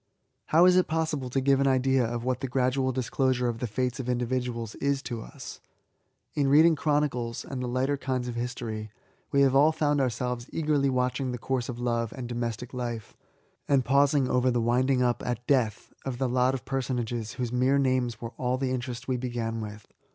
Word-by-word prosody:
How 165 +3 +5
is 180 0 +6
it 185 - +3
possible 155 -5 -1
to 135 - 0
give 135 0 +3
an 140 - +3
idea 130 0 +3
of 120 0 -3
what 130 0 -1
the 135 - -3
gradual 130 +1 +1
disclosure 130 0 0
of 115 -1 -2
the 125 - -2
fates 125 +3 -2
of 125 -1 -4
individuals 125 -2 -2
is 140 0 0
to 120 -4 -4
us? - - -9 0.7
In 145 -2 +1
reading 155 +4 +6
chronicles, 145 -6 -1
and 130 -2 -5
the 125 - -2
lighter 130 +3 0
kinds 130 -2 -2
of 120 - -3
history, 120 -3 -4 0.4
we 140 - +3
have 135 -1 +4
all 145 +3 +6
found 150 -2 +1
ourselves 125 -1 -2
eagerly 150 -3 +1
watching 125 0 0
the 125 - -3
course 125 0 -2
of 120 - -4
love 115 -2 -1
and 130 -3 -6
domestic 120 0 -4
life, 120 -3 -5 0.5
and 135 -3 +3
pausing 140 0 +3
over 125 0 +2
the 120 -1 +1
winding 125 +3 +2
up, 120 -1 +1
at 120 -1 -3
death, 125 -7 0
of 130 -3 -4
the 130 +1 0
lot 125 +1 +2
of 130 - -7
personages 120 -4 -2
whose 125 -1 -3
mere 130 +3 +3
names 130 -4 +1
were 115 0 -6
all 125 0 0
the 130 -1 -1
interest 125 -1 -4
we 130 -1 0
began 120 -2 -3
with. 105 -1 -8
125 Hz, 200 wpm, -27 LUFS, 120-135 Hz, 0.7 s, is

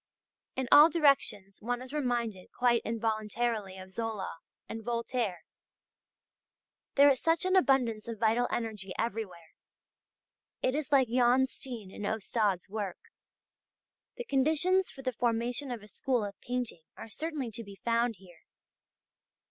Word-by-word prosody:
In 260 -1 -2
all 300 +3 +10
directions 275 - +2
one 240 +2 -1
is 255 +2 -10
reminded 240 -9 -2
quite 240 -2 +2
involuntarily 220 -2 -1
of 185 0 -10
Zola 215 -5 -4 0.3
and 225 0 -6
Voltaire. 235 -4 -2 1.5
There 285 0 +7
is 260 - -1
such 330 +2 +2
an 370 0 +2
abundance 255 - +3
of 230 -1 -5
vital 230 +3 +2
energy 210 -5 -3
everywhere. 200 -7 -4 1.1
It 255 - +2
is 295 -1 -3
like 270 -3 +5
Jan 250 +2 +4
Steen 240 -7 -8
and 205 - -4
Ostade's 210 -3 0
work. 205 -3 -4 1.2
The 485 - -5
conditions 320 - +2
for 270 - -11
the 255 -1 -1
formation 240 +3 -1
of 235 -4 -5
a - - -12
school 245 0 -1
of 200 - -6
painting 245 -8 -3 0.2
are - - -8
certainly 290 +1 -4
to 230 +2 -4
be 200 -2 -11
found 235 0 +2
here. 175 -3 -17
235 Hz, 140 wpm, -31 LUFS, 210-260 Hz, 1.5 s, all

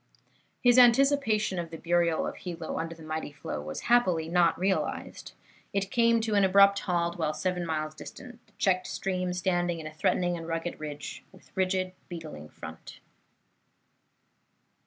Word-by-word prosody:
His 245 0 +6
anticipation 240 -6 +4
of 170 -1 -4
the 165 - -7
burial 170 -1 +1
of - - -5
Hilo 170 -3 -5
under 165 0 -4
the 165 - -13
mighty 155 -1 -4
flow 145 - -6
was 75 +1 -6
happily 185 -10 +3
not 170 -1 +3
realized. 190 +1 -2 0.4
It 195 0 -1
came 230 -1 +4
to 220 -1 -1
an 200 -1 +4
abrupt 200 +1 +6
halt 170 -1 -1
while 155 -1 0
seven 180 0 -2
miles 155 -1 -2
distant, 240 +9 -11
the - - -29
checked 185 -1 +1
stream 185 -1 -2
standing 175 -1 0
in 160 - -8
a 155 - -7
threatening 175 +3 +1
and 165 0 -7
rugged 165 +1 -3
ridge, 150 -1 -7
with - - -20
rigid, 185 0 0 0.2
beetling 155 - -8
front. 80 0 -10
175 Hz, 155 wpm, -28 LUFS, 160-195 Hz, 0.4 s, His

